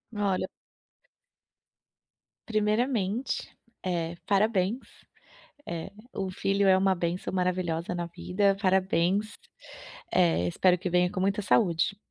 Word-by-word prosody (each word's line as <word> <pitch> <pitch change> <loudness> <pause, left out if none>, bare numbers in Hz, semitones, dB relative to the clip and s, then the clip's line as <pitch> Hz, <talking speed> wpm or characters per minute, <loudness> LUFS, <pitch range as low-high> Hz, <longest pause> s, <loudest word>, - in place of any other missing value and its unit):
Olha 200 -3 0 2.0
Primeiramente, 215 +1 0 0.4
eh, 170 -2 -2
parabéns, 205 +1 +2 0.9
eh, 170 +3 -5 0.2
um 190 - -2
filho 195 +2 0
é 190 0 +6
uma 190 0 +3
bênção 175 +2 -3
maravilhosa 180 -2 -1
na 175 -1 -2
vida. 195 +3 0
Parabéns, 190 +1 +1 0.8
eh, 165 - +3
espero 180 - +3
que 180 +1 -3
venha 180 0 +2
com 195 - -4
muita 200 +2 +1
saúde, 185 -1 +2
185 Hz, 105 wpm, -28 LUFS, 175-200 Hz, 2.0 s, é